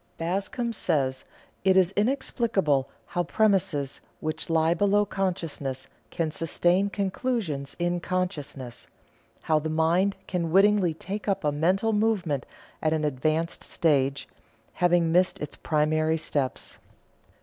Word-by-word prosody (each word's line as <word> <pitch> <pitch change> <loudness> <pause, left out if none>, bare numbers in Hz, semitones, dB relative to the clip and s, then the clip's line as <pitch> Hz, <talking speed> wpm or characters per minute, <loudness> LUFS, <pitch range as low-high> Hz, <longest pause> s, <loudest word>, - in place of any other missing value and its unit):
Bascom 200 +8 -2
says: 135 -10 0 0.4
"It 190 0 +4
is 185 -1 +4
inexplicable 205 - +1 0.2
how 175 - -2
premises 185 -8 +1 0.2
which 155 +1 -4
lie 165 0 +3
below 205 +3 +3
consciousness 160 -9 -3 0.2
can 160 +3 -2
sustain 175 +5 +1
conclusions 195 - -2
in 175 0 0
consciousness; 145 -10 -4 0.6
how 155 -1 +2
the 155 +1 -3
mind 170 +5 +2
can 170 -3 -2
wittingly 195 -2 +4
take 200 +6 -6
up 195 -3 0
a 150 - +2
mental 185 +9 +1
movement 200 - 0 0.3
at 155 0 +2
an 155 -1 0
advanced 155 +4 -1
stage, 140 -4 +1 0.5
having 175 -2 +2
missed 180 +2 +2
its 150 - -5
primary 155 +1 +1
steps." 145 -4 -3
170 Hz, 120 wpm, -26 LUFS, 155-195 Hz, 0.6 s, It